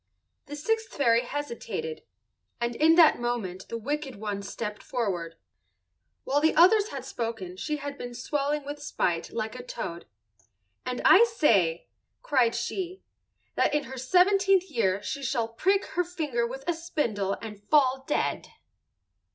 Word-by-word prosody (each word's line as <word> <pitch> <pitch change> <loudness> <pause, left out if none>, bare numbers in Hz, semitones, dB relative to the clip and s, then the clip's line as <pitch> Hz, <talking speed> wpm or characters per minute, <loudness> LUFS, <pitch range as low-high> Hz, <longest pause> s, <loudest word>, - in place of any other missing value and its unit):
The 290 - -6
sixth 445 +9 -1
fairy 235 -4 +4
hesitated, 230 - -5 0.6
and 235 0 -1
in 320 +4 +5
that 330 -6 +6
moment 220 -7 -3
the 230 - -3
wicked 285 +3 -3
one 205 -1 -4
stepped 210 +1 -5
forward. 180 -9 -3 0.9
While 285 +2 +1
the 315 - +3
others 400 +5 +6
had 270 -2 -6
spoken 225 -8 -4
she 300 +10 -3
had 285 0 -6
been 245 0 -6
swelling 285 +3 -1
with 290 +1 -6
spite 175 - -1
like 220 -1 -3
a 250 - -7
toad. 170 -8 -6 0.8
"And 250 -1 -3
I 390 +5 +8
say," 200 - +2 0.4
cried 250 -5 +2
she, 365 +10 -4 0.5
"that - - +2
in 295 - +1
her 265 - -8
seventeenth 380 +5 +3
year 205 -6 +1
she 280 +6 -4
shall 255 -4 -1
prick 385 +12 +1
her 355 - +2
finger 300 -9 -2
with 270 +3 -8
a 345 - +2
spindle 235 - -2
and 210 -3 -9
fall 265 -3 +4
dead." - - -1
260 Hz, 150 wpm, -27 LUFS, 225-305 Hz, 0.9 s, I